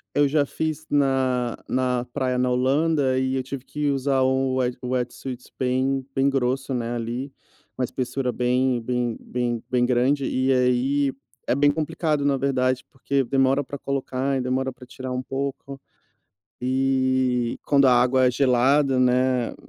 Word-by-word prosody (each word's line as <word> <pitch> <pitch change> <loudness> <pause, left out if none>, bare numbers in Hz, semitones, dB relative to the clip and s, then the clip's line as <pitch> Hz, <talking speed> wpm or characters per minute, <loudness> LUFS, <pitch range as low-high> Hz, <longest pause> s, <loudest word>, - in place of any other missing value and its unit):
eu 145 0 +4
já 145 0 +2
fiz 155 +1 -3
na 130 -4 +1
na 125 -1 0
praia 130 -3 -1
na 125 0 +1
Holanda. 135 +1 +2
E 130 0 0
eu 130 - -1
tive 135 0 -7
que 150 -1 -2
usar 135 0 +1
o 130 0 +1
o - - -1
wet 125 -1 0
wetsuit 125 0 -4
bem 130 +1 0
bem 135 +1 +3
grosso, 135 0 -1
né, 120 -1 -2
ali. 120 +4 -4 0.5
Uma 130 - -1
espessura 125 +1 -2
bem 125 0 +1
bem 120 0 -2
bem 125 -1 +2
grande. 130 +3 +1
E 130 +1 +1
aí 130 +2 +2 0.3
é - - +1
bem 145 +1 +4
complicado, 155 -1 -1
na 140 -1 +2
verdade, 130 -2 0
porque 135 0 -1
demora 135 +2 +2
pra 140 +2 -7
colocar 135 0 -2
e - - -1
demora 130 +1 -1
pra 125 0 -14
tirar 130 +1 -7
um 125 0 -2
pouco. 135 0 -5 0.8
E, 130 -1 +1
quando 140 -1 +4
a 125 - +6
água 125 +1 +4
é - - +4
gelada, 135 +1 +3
né, 125 -1 +2
130 Hz, 160 wpm, -24 LUFS, 125-135 Hz, 0.8 s, a